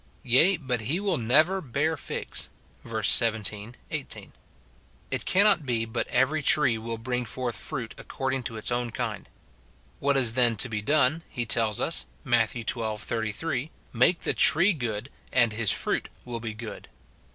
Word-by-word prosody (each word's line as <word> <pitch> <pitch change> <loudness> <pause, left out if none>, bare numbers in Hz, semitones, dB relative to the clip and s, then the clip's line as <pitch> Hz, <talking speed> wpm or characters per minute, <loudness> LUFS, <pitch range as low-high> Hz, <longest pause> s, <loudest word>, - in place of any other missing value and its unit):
"Yea, 150 +9 +4
but 130 -6 -3
he 140 - -1
will 195 -6 -1
never 155 +12 +3
bear 150 +4 -1
figs," 145 - -5 0.3
verses - - +1
17, 110 0 0 0.2
18; - - -6 0.8
it - - -3
cannot 200 -3 +4
be 120 -4 -1
but 110 - -3
every 150 +4 +1
tree 135 -4 +3
will 115 +1 -5
bring 125 +2 -3
forth 120 0 -4
fruit 125 -7 -4
according 135 0 -3
to 115 -2 -6
its 110 - -2
own 120 0 -1
kind. 110 - -5 0.7
What 140 0 +2
is 120 -4 +3
then 120 -2 +2
to 125 - +1
be 110 -2 -3
done, 145 +5 +2
he 120 -4 -3
tells 110 -2 +2
us, - - -1 0.2
Matt. 115 -2 +2
xii. 120 - -6
33, 115 +5 -2
" - - -32
Make 130 +9 +3
the - - 0
tree 175 +7 +7
good, 120 -3 -5 0.2
and 120 -4 +3
his 110 -1 0
fruit - - +2 0.2
will 120 -1 -5
be 110 -1 -6
good." 110 -1 -9
120 Hz, 165 wpm, -26 LUFS, 115-140 Hz, 0.8 s, tree